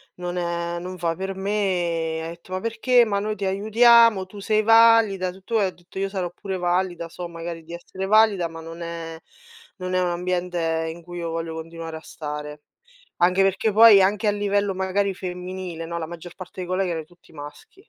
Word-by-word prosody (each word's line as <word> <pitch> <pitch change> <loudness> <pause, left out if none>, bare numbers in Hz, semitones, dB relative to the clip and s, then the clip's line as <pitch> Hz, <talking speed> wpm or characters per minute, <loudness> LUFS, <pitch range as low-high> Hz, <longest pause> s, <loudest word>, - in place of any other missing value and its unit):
non 180 0 -5
è 170 0 -2
non 185 +1 -7
fa 165 -1 -1
per 190 +1 -4
me". 180 -5 -1
E - - -4
ha - - -5
etto: 170 +2 -10
"Ma 185 - -1
perché? 230 +2 +3
Ma 200 -3 0
noi 215 +1 -2
ti 200 - -7
aiutiamo, 220 +1 +5
tu 205 +1 -11
sei 215 +1 +1
valida, 225 -4 +5
tutto 195 +5 -2
e" 200 - +3
ho - - -4
detto: 175 +2 -16
"Io 195 0 -1
sarò 185 -3 -3
pure 190 +1 -5
valida, 175 -1 -1
so 175 +1 -7
magari 165 -1 -7
di 170 +2 -11
essere 190 +2 -6
valida, 210 -4 +4
ma 165 0 -10
non 165 +1 -9
è 165 -1 -6 0.6
non 185 0 -4
è 185 - +2
un 180 - +1
ambiente 175 -2 -1
in 170 - -13
cui 175 0 -9
io 170 -1 -3
voglio 165 0 -4
continuare 165 0 -7
a - - -11
stare". 150 -1 -7 0.6
Anche 180 +2 +4
perché 195 +3 +1
poi 215 -2 +8
anche 210 +3 +1
a - - +5
livello 205 -1 0
magari 190 +1 0
femminile, 180 -2 -6
no, 170 +1 -5
la 160 - -4
maggior 170 +1 -10
parte 185 0 -9
dei 180 - -4
colleghi 185 0 0
era 160 -1 -2
tutti 175 0 -23
maschi. 145 - -11
180 Hz, 210 wpm, -23 LUFS, 170-200 Hz, 0.6 s, poi